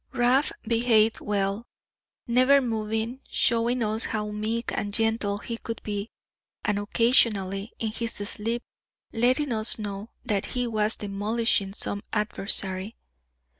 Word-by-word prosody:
Rab 250 Hz, +4 st, +3 dB, 0.2 s
behaved 225 Hz, -1 st, +3 dB
well, 200 Hz, +2 st, -1 dB, 0.6 s
never 255 Hz, +4 st, +5 dB
moving, 225 Hz, 0 st, -2 dB
showing 235 Hz, +1 st, +2 dB
us 220 Hz, +1 st, +2 dB
how 210 Hz, -2 st, -2 dB
meek 220 Hz, +3 st, -2 dB
and 205 Hz, -, -2 dB
gentle 220 Hz, -2 st, +1 dB
he 230 Hz, +2 st, -6 dB
could 230 Hz, -, -5 dB
be, 205 Hz, +1 st, -3 dB, 0.6 s
and 210 Hz, -2 st, +1 dB
occasionally, 205 Hz, -2 st, +2 dB
in 220 Hz, -2 st, -2 dB
his 230 Hz, +1 st, -2 dB
sleep, 225 Hz, +3 st, -3 dB, 0.5 s
letting 255 Hz, +5 st, +2 dB
us 220 Hz, 0 st, +1 dB
know 205 Hz, 0 st, -5 dB, 0.2 s
that 200 Hz, -2 st, 0 dB
he 245 Hz, -, +1 dB
was 215 Hz, -1 st, +2 dB
demolishing 205 Hz, 0 st, 0 dB
some 205 Hz, -2 st, -4 dB
adversary. 200 Hz, -1 st, 0 dB
220 Hz, 125 wpm, -26 LUFS, 205-235 Hz, 0.6 s, never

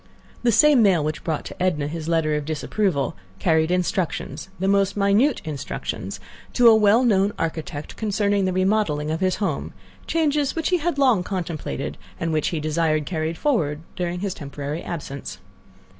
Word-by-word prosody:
The 240 Hz, -, +3 dB
same 275 Hz, +3 st, +6 dB
mail 190 Hz, -7 st, +4 dB
which 155 Hz, +1 st, -3 dB
brought 160 Hz, -3 st, -2 dB
to 190 Hz, -, -9 dB
Edna 170 Hz, -6 st, +1 dB
his 160 Hz, +1 st, -5 dB
letter 165 Hz, -2 st, +1 dB
of 150 Hz, 0 st, -1 dB
disapproval 155 Hz, +1 st, -1 dB, 0.2 s
carried 160 Hz, +6 st, +2 dB
instructions—the 185 Hz, +1 st, -2 dB
most 195 Hz, 0 st, +2 dB
minute 205 Hz, +8 st, +3 dB
instructions—to 155 Hz, -, -2 dB
a 230 Hz, -, +9 dB
well 220 Hz, +2 st, +5 dB
known 205 Hz, -3 st, +3 dB
architect 155 Hz, -2 st, -4 dB
concerning 205 Hz, -2 st, +1 dB
the 185 Hz, -, +1 dB
remodeling 185 Hz, -6 st, +1 dB
of 160 Hz, -, -1 dB
his 185 Hz, -1 st, +1 dB
home, 175 Hz, -9 st, -2 dB, 0.3 s
changes 300 Hz, -3 st, +1 dB
which 325 Hz, -1 st, 0 dB
he 365 Hz, -, +3 dB
had 340 Hz, -2 st, -1 dB
long 255 Hz, -9 st, +4 dB
contemplated, 170 Hz, -, -4 dB, 0.2 s
and 165 Hz, -1 st, -1 dB
which 155 Hz, -1 st, +1 dB
he 165 Hz, -, -1 dB
desired 155 Hz, 0 st, 0 dB
carried 160 Hz, -1 st, -2 dB
forward 160 Hz, -, 0 dB
during 175 Hz, 0 st, -3 dB
his 200 Hz, -2 st, -2 dB
temporary 145 Hz, +1 st, -5 dB
absence. 140 Hz, -5 st, -6 dB
180 Hz, 160 wpm, -23 LUFS, 155-210 Hz, 0.3 s, a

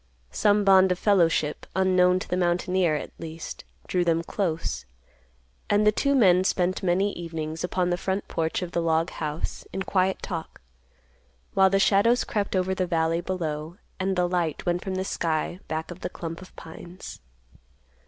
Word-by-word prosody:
Some 205 Hz, -, +3 dB
bond 190 Hz, -1 st, +6 dB
of 180 Hz, -, +1 dB
fellowship, 170 Hz, -7 st, +2 dB
unknown 185 Hz, -1 st, +4 dB
to 185 Hz, -, -5 dB
the -, -, -1 dB
mountaineer, 180 Hz, -1 st, +1 dB
at 150 Hz, -, -5 dB
least, 165 Hz, 0 st, -7 dB, 0.2 s
drew 180 Hz, -1 st, +1 dB
them 165 Hz, -1 st, +1 dB
close, 165 Hz, -, -2 dB, 0.8 s
and 205 Hz, +1 st, +3 dB
the 210 Hz, -, +6 dB
two 280 Hz, +6 st, +1 dB
men 185 Hz, -7 st, +5 dB
spent 185 Hz, -1 st, 0 dB
many 190 Hz, +2 st, +1 dB
evenings 160 Hz, -1 st, -5 dB
upon 180 Hz, 0 st, 0 dB
the 175 Hz, -, +1 dB
front 190 Hz, +1 st, -2 dB
porch 165 Hz, +2 st, -1 dB
of 175 Hz, -, -6 dB
the 170 Hz, -, 0 dB
log 165 Hz, 0 st, +1 dB
house 155 Hz, 0 st, -4 dB
in 190 Hz, -, -3 dB
quiet 190 Hz, 0 st, 0 dB
talk, 165 Hz, -4 st, -5 dB, 0.9 s
while 190 Hz, 0 st, +5 dB
the 195 Hz, -, +2 dB
shadows 210 Hz, +5 st, +4 dB
crept 205 Hz, -2 st, -2 dB
over 185 Hz, 0 st, +1 dB
the 185 Hz, -1 st, -1 dB
valley 165 Hz, 0 st, +1 dB
below; 165 Hz, -2 st, -4 dB, 0.2 s
and 190 Hz, 0 st, 0 dB
the 180 Hz, -1 st, +2 dB
light 175 Hz, -3 st, -1 dB
went 175 Hz, +1 st, 0 dB
from 190 Hz, -1 st, -3 dB
the 190 Hz, 0 st, -2 dB
sky 165 Hz, 0 st, -1 dB
back 160 Hz, +2 st, -4 dB
of 175 Hz, -, -9 dB
the -, -, -4 dB
clump 165 Hz, 0 st, -7 dB
of 185 Hz, -, -14 dB
pines. 175 Hz, +2 st, -10 dB
180 Hz, 175 wpm, -26 LUFS, 165-190 Hz, 0.9 s, bond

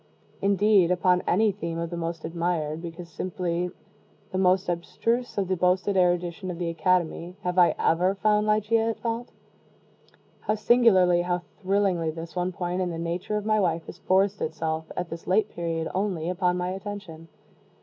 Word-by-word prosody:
Indeed 200 Hz, -2 st, +4 dB
upon 180 Hz, 0 st, +3 dB
any 210 Hz, +4 st, +3 dB
theme 170 Hz, -4 st, -5 dB
of 170 Hz, 0 st, -3 dB
the -, -, -3 dB
most 165 Hz, -1 st, -4 dB
admired 165 Hz, -2 st, -2 dB
because 170 Hz, 0 st, -7 dB
simply 175 Hz, +1 st, -2 dB, 0.6 s
the 185 Hz, -, -2 dB
most 185 Hz, +1 st, +3 dB
abstruse 230 Hz, +8 st, -1 dB
of 195 Hz, -2 st, 0 dB
the 190 Hz, -, +1 dB
boasted 185 Hz, +3 st, +1 dB
erudition 180 Hz, 0 st, +1 dB
of 175 Hz, -, -4 dB
the 175 Hz, -1 st, -2 dB
Academy, 175 Hz, 0 st, 0 dB
have 180 Hz, 0 st, 0 dB
I 175 Hz, -, +5 dB
ever 180 Hz, +4 st, +2 dB
found 210 Hz, +1 st, +2 dB
Ligeia 220 Hz, +2 st, +2 dB
at 225 Hz, -, -4 dB
fault? 235 Hz, +1 st, -3 dB, 1.1 s
How 215 Hz, -, -1 dB
singularly 205 Hz, -6 st, +4 dB
how 175 Hz, 0 st, -1 dB, 0.2 s
thrillingly, 190 Hz, -4 st, +1 dB
this 165 Hz, +2 st, -7 dB
one 180 Hz, 0 st, 0 dB
point 180 Hz, +1 st, -2 dB
in 180 Hz, -, 0 dB
the 165 Hz, -, -4 dB
nature 170 Hz, +5 st, -2 dB
of 210 Hz, -, -4 dB
my 215 Hz, 0 st, +2 dB
wife 170 Hz, -4 st, 0 dB
has 175 Hz, -, -10 dB
forced 195 Hz, +2 st, +2 dB
itself, 160 Hz, 0 st, -3 dB
at 180 Hz, -, -2 dB
this 165 Hz, 0 st, -7 dB
late 210 Hz, +3 st, +2 dB
period 165 Hz, -1 st, -3 dB
only, 185 Hz, -4 st, -1 dB
upon 180 Hz, -1 st, +1 dB
my 180 Hz, 0 st, -1 dB
attention! 190 Hz, -4 st, -7 dB
180 Hz, 170 wpm, -26 LUFS, 170-200 Hz, 1.1 s, I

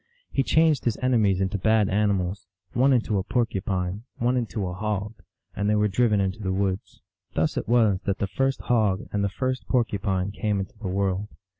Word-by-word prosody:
He -, -, +2 dB
changed 155 Hz, +1 st, +3 dB
his 115 Hz, -3 st, +1 dB
enemies 110 Hz, -7 st, +2 dB
into 95 Hz, +1 st, -1 dB
bad 110 Hz, 0 st, +3 dB
animals, 100 Hz, -2 st, 0 dB, 0.3 s
one 130 Hz, +3 st, +4 dB
into 110 Hz, -5 st, +2 dB
a -, -, -2 dB
porcupine, 95 Hz, -4 st, -1 dB, 0.2 s
one 125 Hz, +2 st, +1 dB
into 115 Hz, -4 st, -2 dB
a 90 Hz, -, -3 dB
hog, 105 Hz, +1 st, -2 dB, 0.4 s
and 100 Hz, +1 st, 0 dB
they 105 Hz, -, +3 dB
were 105 Hz, 0 st, +3 dB
driven 105 Hz, 0 st, +2 dB
into 95 Hz, +2 st, -1 dB
the 95 Hz, -3 st, -2 dB
woods. 95 Hz, 0 st, -2 dB, 0.3 s
Thus -, -, +1 dB
it -, -, -3 dB
was 110 Hz, -5 st, +3 dB
that 100 Hz, -, 0 dB
the -, -, -1 dB
first 135 Hz, +7 st, -1 dB
hog 105 Hz, -6 st, +1 dB
and 100 Hz, -1 st, +1 dB
the 100 Hz, -, +1 dB
first 130 Hz, +2 st, -3 dB
porcupine 100 Hz, -6 st, 0 dB
came 105 Hz, -1 st, -1 dB
into 95 Hz, -, -5 dB
the 110 Hz, -, -5 dB
world. 95 Hz, +1 st, -1 dB
105 Hz, 190 wpm, -25 LUFS, 95-115 Hz, 0.4 s, one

